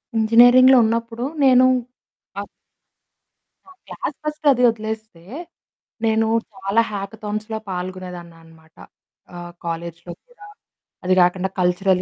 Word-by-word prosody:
ఇంజినీరింగ్‌లో 245 +4 +6
ఉన్నప్పుడు 230 +1 -2 0.2
నేను 255 -1 +6 0.8
అవ్ - - -9 1.2
ఆ! - - -19 0.2
క్లాస్ - - -5
ఫస్ట్ 305 0 -6
అది 250 -2 +1
వదిలేస్తే, 220 -5 -6 0.8
నేను 220 0 +1 0.3
చాలా 195 +3 0
హ్యాకథాన్స్‌లొ 215 +2 -5
పాల్గొనేదాన్నమాట. 175 -3 -9 0.6
ఆహ్, 175 0 -9
కాలేజీలొ 170 +1 -6 0.2
కూడా. 450 -4 -16 0.6
అది 185 - +2
గాకండా 180 +1 +2
కల్చరల్ 180 +1 +1
205 Hz, 95 wpm, -20 LUFS, 180-230 Hz, 1.2 s, ఇంజినీరింగ్‌లో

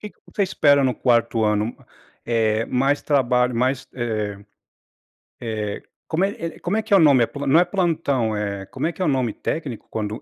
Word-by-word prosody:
que 210 - -7
que - - -29
você 205 - +1
espera 145 -6 +3
no 130 -1 +2
4º 115 -2 +2
ano, 105 +2 0 0.5
eh, 115 -1 +1
mais 135 +3 +1
trabalho 125 -3 +2
mais, 130 +2 0
eh 110 -5 -3 1.0
eh, 110 -3 -4 0.2
como 170 +4 0
é 170 -4 -4
como 190 +5 -1
é 220 - 0
que 215 -1 -8
é - - +8
o - - +5
nome? 140 -6 +6
É - - -3
plo 145 0 -6
não 140 +4 +5
é - - +4
plantão, 160 - 0
eh, 100 -2 -3
como - - -4
é 170 - -1
que 185 - -6
é - - +2
o - - +1
nome 130 -5 +1
técnico 140 -5 -5
quando 110 0 -4
125 Hz, 205 wpm, -22 LUFS, 110-160 Hz, 1.0 s, é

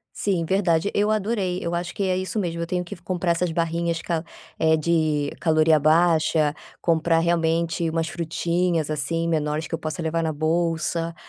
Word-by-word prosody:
Sim, 185 -5 0
verdade. 180 0 +1
Eu 210 +1 +2
adorei, 205 -4 0
eu 170 0 -3
acho 175 0 -3
que 200 - -1
é 185 -1 +1
isso 185 +4 -3
mesmo, 170 -4 -2
eu 170 - -3
tenho 180 +1 -1
que 175 - -8
f 170 - -20
comprar 180 0 -1
essas 170 0 0
barrinhas 170 0 -1
ca 165 -1 -2 0.4
é 160 0 +4
de 155 -2 +1
caloria 155 -1 +4
baixa, 155 -1 +3 0.3
comprar 165 0 +2
realmente 165 0 +1
umas 165 0 -1
frutinhas, 170 -1 -1
assim, 155 +3 -1
menores 155 -1 -1
que - - -11
eu - - -9
possa 155 +1 -4
levar 165 +1 -1
na 160 -1 -1
bolsa 165 +1 -1
165 Hz, 180 wpm, -24 LUFS, 160-175 Hz, 0.4 s, é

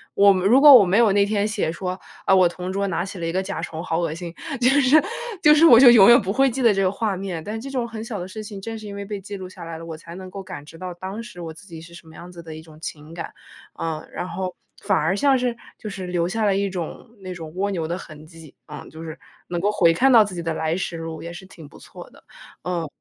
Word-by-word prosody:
我 200 0 +6
如 195 +8 +4
果 290 -1 +10
我 235 -6 +9
没 190 +3 +2
有 230 -4 +5
那 200 0 +4
天 205 0 0
写 215 -7 -1
说， 185 +2 -5 0.3
“啊， 195 - +4
我 185 -2 +5
同 180 +1 -6
桌 200 0 -1
拿 180 +1 -2
起 190 -2 -8
了 165 - -3
一 165 - -2
个 190 +2 -1
甲 195 +1 -5
虫， 160 +1 -6
好 165 -1 -1
恶 165 -3 -1
心”， 170 0 -7 0.3
就 250 +1 +4
是 275 +4 +6 0.4
就 300 - +8
是 320 +2 +6
我 235 -5 +9
就 250 -3 +9
永 215 -2 +8
远 240 - +8
不 195 +1 -3
会 270 +1 +3
记 260 +2 -3
得 230 -3 +5
这 195 - 0
个 185 -1 +2
画 205 -1 -2
面。 180 -4 -5
但 220 +2 -5
这 275 - -7
种 250 -3 -2
很 220 -1 -7
小 225 -4 -5
的 180 - -6
事 215 +3 -8
情 205 -2 -8
正 225 +2 -6
是 215 - -10
因 200 - -7
为 200 - -5
被 200 0 -6
记 200 +1 -8
录 185 -1 -8
下 - - -11
来 165 -1 -7
了， 165 - -9
我 160 -1 -7
才 165 +1 -12
能 185 0 -9
够 195 +1 -8
感 185 -7 -9
知 160 +2 -14
到 180 0 -6
当 190 +5 -7
时 175 -6 -11
我 165 - -6
自 160 +6 -14
己 165 -4 -10
是 170 +1 -14
什 165 - -14
么 160 - -15
样 175 +1 -11
子 170 -1 -11
的 160 -1 -9
一 160 - -9
种 155 -1 -16
情 155 0 -8
感。 170 - -7 0.5
嗯， 160 -1 -4
然 180 - -5
后， 185 +1 -4 0.3
反 - - +2
而 160 +5 +1
像 270 +4 +3
是 245 -2 -2 0.2
就 215 - -6
是 190 -2 -6
留 175 -1 -1
下 215 +4 -1
了 195 -1 +2
一 200 0 0
种 180 +5 -6
那 185 -1 -6
种 160 -3 -9
蜗 200 +2 -1
牛 165 -4 -3
的 175 +2 -3
痕 155 -3 -12
迹， 165 -3 -15
嗯， - - -9
就 160 +1 -10
是 160 -1 -8 0.3
能 175 -1 -3
够 205 +3 +1
回 170 -5 +4
看 265 +8 +3
到 225 -3 +8
自 195 -3 -7
己 170 - -5
的 165 - -2
来 160 +1 -1
时 180 -2 -4
路 165 -1 -7
也 170 +1 -7
是 190 - -10
挺 160 -6 -13
不 - - -16
错 - - -12
的。 - - -20 0.4
嗯。 175 -3 -3
185 Hz, 320 characters per minute, -22 LUFS, 165-210 Hz, 0.5 s, 果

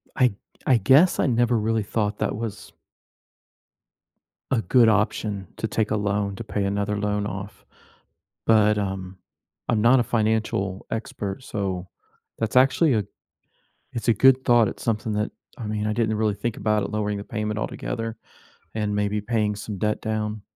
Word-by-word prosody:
I 125 -5 +3 0.3
I 130 - +5
guess 135 - +5
I - - +3
never 120 -1 +2
really 110 0 0
thought 105 0 -1
that - - -1
was 105 -2 -6 1.8
a 120 - +2
good 115 +4 +5
option 105 -2 0
to 110 - -2
take 110 0 0
a - - +2
loan, 100 -1 -1
to 115 - -6
pay 105 -2 -2
another 100 +1 -1
loan 105 0 -1
off. 100 0 -7 0.8
But, 105 -1 +4
um, 95 -2 -4 0.5
I'm 115 -3 +2
not 120 +4 +5
a - - +1
financial 110 -4 0
expert, 105 -1 -4
so 95 -5 -3 0.5
that's 115 +3 -2
actually 135 +3 +5
a 105 -2 +1 0.9
it's 115 0 -4
a 115 - +6
good 130 +4 +5
thought, 120 -2 +5
it's - - -7
something 110 -1 -1
that, 105 +1 -1 0.3
I 115 - -6
mean, 105 0 -2
I 105 - 0
didn't 110 -2 +1
really 105 -1 +1
think 110 +3 -3
about 105 -1 +1
it - - -4
lowering 105 -1 -1
the 100 - -6
payment 105 -1 -3
altogether 115 0 -4 0.6
and 105 -2 -1
maybe 105 0 0
paying 105 -1 0
some 105 0 -6
debt 105 +3 -1
down. 110 -1 -2
105 Hz, 165 wpm, -24 LUFS, 105-115 Hz, 1.8 s, a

